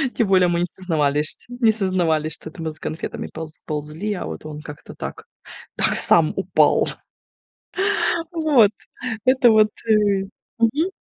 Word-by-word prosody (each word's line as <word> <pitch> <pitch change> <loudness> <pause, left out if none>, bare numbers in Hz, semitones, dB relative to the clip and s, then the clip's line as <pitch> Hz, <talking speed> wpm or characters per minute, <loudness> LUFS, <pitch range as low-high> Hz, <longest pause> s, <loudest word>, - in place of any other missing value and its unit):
Тем 230 - +1
более, 185 -2 +4
мы 170 0 0
не - - +2
сознавались 150 -5 0
шть - - -12 0.2
не 225 -2 +6
сознавались, 175 -7 0
что 160 - -8
это 160 - -11
мы 160 - -2
за 155 - -15
конфетами 160 - -5
полз 160 -1 -7
ползли, 155 +7 -4
а 190 - -5
вот - - -7
он 150 -1 -7
как-то 150 -1 -11
так - - -7 0.5
так - - +2
сам - - +3
упал. - - +3 1.4
Вот, 300 - +4 0.5
это 255 -1 +5
вот 215 -1 +5 0.2
и 205 -3 +3 0.3
мгм. 280 +11 +1
185 Hz, 150 wpm, -22 LUFS, 155-220 Hz, 1.4 s, не